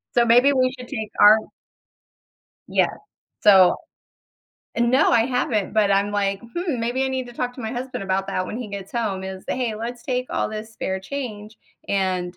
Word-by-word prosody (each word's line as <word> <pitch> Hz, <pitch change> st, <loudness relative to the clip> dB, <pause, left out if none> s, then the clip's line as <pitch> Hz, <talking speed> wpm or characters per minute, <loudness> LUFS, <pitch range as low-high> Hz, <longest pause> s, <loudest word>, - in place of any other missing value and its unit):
So 240 Hz, -, +5 dB
maybe 245 Hz, +5 st, +5 dB
we 255 Hz, -1 st, +2 dB
should 250 Hz, -1 st, -9 dB
take 220 Hz, -1 st, -5 dB
our 210 Hz, +1 st, +8 dB, 1.3 s
Yeah, -, -, +2 dB, 0.5 s
so 190 Hz, -4 st, +7 dB, 1.0 s
no, 240 Hz, +3 st, +3 dB
I 230 Hz, 0 st, +4 dB
haven't, 250 Hz, -5 st, -1 dB
but 210 Hz, -2 st, +3 dB
I'm 200 Hz, +1 st, +2 dB
like, 200 Hz, -1 st, -1 dB, 0.2 s
"Hmm, 330 Hz, -9 st, -1 dB
maybe 245 Hz, +3 st, 0 dB
I -, -, 0 dB
need 260 Hz, -1 st, -3 dB
to 240 Hz, -, -11 dB
talk 245 Hz, +1 st, -3 dB
to 255 Hz, -, -9 dB
my 220 Hz, -1 st, -4 dB
husband 255 Hz, -3 st, -5 dB
about 190 Hz, 0 st, -1 dB
that 185 Hz, 0 st, -2 dB
when 220 Hz, -, -5 dB
he 245 Hz, -, -5 dB
gets 200 Hz, -1 st, -7 dB
home" 215 Hz, -5 st, -2 dB
is, 190 Hz, 0 st, -7 dB
"Hey, 245 Hz, -4 st, -1 dB
let's 235 Hz, +2 st, -6 dB
take 255 Hz, -1 st, -2 dB
all -, -, -1 dB
this 215 Hz, +1 st, -7 dB
spare 190 Hz, -3 st, -3 dB
change 215 Hz, -2 st, -6 dB, 0.3 s
and 185 Hz, -2 st, -1 dB
225 Hz, 185 wpm, -23 LUFS, 200-250 Hz, 1.3 s, our